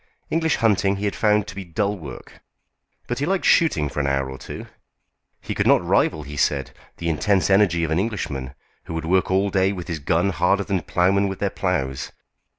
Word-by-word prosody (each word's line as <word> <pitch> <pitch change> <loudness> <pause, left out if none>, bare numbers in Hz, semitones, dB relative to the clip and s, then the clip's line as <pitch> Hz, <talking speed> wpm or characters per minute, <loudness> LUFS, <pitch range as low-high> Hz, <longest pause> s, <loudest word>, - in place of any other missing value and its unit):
English 160 -1 +2
hunting 100 -3 +2
he 100 +1 -4
had 100 - -1
found 105 -1 +2
to 105 - -8
be 95 0 -6
dull 100 +4 -1
work. 70 -10 -11 0.6
But 120 +1 -3
he 145 - -1
liked 190 0 0
shooting 85 - +3
for 75 - -5
an 70 - 0
hour 70 -1 0
or 65 - -8
two. - - -8 0.8
He - - -4
could - - 0
not - - +4
rival, 80 -1 +2
he 75 +1 -8
said, 70 -1 0 0.3
the 85 - -4
intense 95 +5 +1
energy 95 -4 +4
of 80 - -1
an 80 - +2
Englishman, 70 - -3 0.3
who 80 - -6
would 80 -1 -3
work 95 +3 +2
all 95 +1 +2
day 95 0 +2
with 90 -4 -6
his 85 -3 -3
guns 85 +7 +1
harder 100 +3 +3
than 95 -2 -1
ploughmen 95 +4 +2
with 95 -1 -4
their 100 -1 -1
ploughs. 65 -9 -2
95 Hz, 210 wpm, -23 LUFS, 80-100 Hz, 0.8 s, not